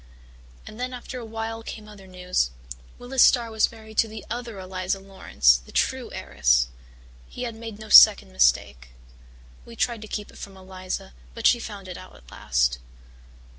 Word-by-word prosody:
And 215 - -11
then 250 0 -3
after 250 +1 -8
a 235 - -8
while 225 0 -5
came 215 -1 -9
other 200 -2 -14
news 180 - -1 0.5
Willis 250 +1 -1
Starr 235 -2 +5
was 220 -1 +2
married 220 -1 -7
to 225 - +4
the 220 0 -9
other 235 -3 -5
Eliza 185 0 -3
Laurance, 125 - +2
the - - -15
true - - -1
heiress. 60 -3 +1 0.6
He 250 - -7
had 235 -2 -4
made 225 -1 -9
no 215 0 -11
second 65 - +8
mistake. - - +1 0.7
We 235 - -13
tried 235 -1 -1
to 215 - -9
keep 210 0 -6
it - - -15
from 195 -1 -9
Eliza 185 - -7 0.2
but - - -6
she 240 - +5
found 205 -4 -8
it 180 - -7
out - - -13
at 60 - -18
last. - - 0
205 Hz, 175 wpm, -24 LUFS, 180-225 Hz, 0.7 s, second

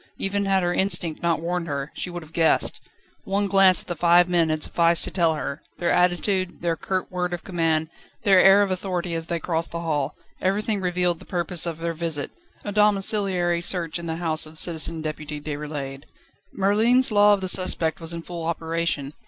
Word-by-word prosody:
Even 200 +1 -1
had 190 -1 +2
her 175 0 +1
instinct 175 -4 0
not 170 -2 0
warned 175 0 -2
her, 140 -1 -4
she - - -5
would 175 -1 -7
have 155 +1 -17
guessed. 165 -1 +2 0.4
One 200 +1 0
glance 195 -2 +5
at - - -24
the 175 - -3
five 175 +2 +4
men 170 -2 +2
had 155 0 0
sufficed 170 0 +3
to - - -2
tell 165 -4 +2
her: 140 -2 -5 0.2
their 175 - 0
attitude, 180 +1 0
their 170 -1 +1
curt 185 +3 -3
word 180 -1 -2
of 175 - -11
command, 165 -3 0 0.4
their 195 -2 +6
air 195 +1 +7
of 195 - -2
authority 180 -2 -3
as 165 0 -4
they 170 0 -2
crossed 165 0 -2
the 170 - -5
hall 150 -4 -2 0.3
everything 205 +2 0
revealed 180 -2 0
the - - -13
purpose 175 -1 -1
of 165 -2 -4
their 165 0 -3
visit: 160 -3 -3 0.3
a 205 - -3
domiciliary 195 -4 +1
search 170 -2 -1
in 170 - -7
the 160 - -2
house 160 -2 -1
of 155 +1 -8
Citizen 160 -1 -2
Deputy 150 -1 -5
Déroulède. 145 -2 -6 0.5
Merlin's 225 +6 +3
Law 205 0 +6
of 195 - -8
the 190 - -2
Suspect 175 -3 0
was 165 -1 -5
in 170 -1 -6
full 170 -1 -7
operation. 165 -3 -2
170 Hz, 200 wpm, -24 LUFS, 160-185 Hz, 0.5 s, air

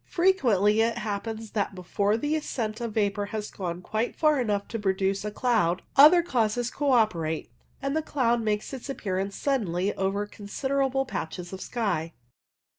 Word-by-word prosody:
Frequently 225 - +3
it 230 +1 +1
happens 220 0 -4
that 205 -2 -1
before 200 +3 0
the 295 +6 -1
ascent 235 -7 -3
of 230 -3 -4
vapour 205 -1 +1
has 210 0 -5
gone 180 -2 -5
quite 220 +5 -2
far 305 -4 +3
enough 205 -4 -1
to 225 - -3
produce 195 0 0
a 210 - -2
cloud, 210 -7 +1
other 315 +5 +8
causes 245 -5 0
co 290 -2 0
operate, 170 -9 +1 0.3
and 275 +1 -1
the 315 - +2
cloud 240 -6 +1
makes 215 +3 -1
its 265 +1 -7
appearance 195 -6 -2
suddenly 200 -8 0
over 195 +2 -1
considerable 270 +6 -1
patches 175 -5 -5
of 190 - -6
sky. 180 -9 -2
215 Hz, 160 wpm, -27 LUFS, 195-250 Hz, 0.3 s, other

